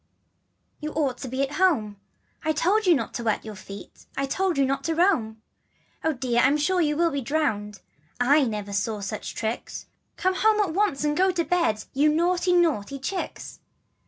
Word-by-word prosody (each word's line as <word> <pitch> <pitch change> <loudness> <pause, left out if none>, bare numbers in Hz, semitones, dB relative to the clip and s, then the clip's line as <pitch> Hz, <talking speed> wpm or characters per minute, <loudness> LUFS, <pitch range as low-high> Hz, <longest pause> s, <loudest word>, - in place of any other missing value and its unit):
L - - -45
rJ - - -36
You 305 - -3
ought 275 -5 0
to 265 - -6
be 260 +2 -1
at 275 +2 -3
home; 230 - +2 0.5
I 315 0 +1
told 390 +7 +1
you 345 - +7
not - - -3
to 240 - -4
wet 220 -2 0
your 215 - -6
feet 200 0 -11
I 275 - +1
told 370 +4 0
you 275 - +4
not 275 +1 -1
to 325 - 0
roam. 235 - +1 0.3
" - - -37
Oh, 320 - +2
dear! 245 -3 0
I'm 275 +3 +4
sure 360 +5 +1
you 300 -2 +1
will 335 0 +2
be 280 -1 -2
drowned 215 -8 -2 0.4
1 270 +1 +4
/"never 205 -2 -5
saw 210 +2 -1
such 200 - -5
tricks 225 +1 -4 0.3
Come 375 -1 +1
home 430 +1 +3
at 385 -6 +1
once, 385 -7 +1
and 295 0 +1
go 375 +3 +3
to 355 -2 0
bed, 335 -13 +1
You 290 +3 +3
naughty 350 +3 +1
naughty 305 - +2
chicks. 360 +8 -5
290 Hz, 205 wpm, -25 LUFS, 235-350 Hz, 0.5 s, you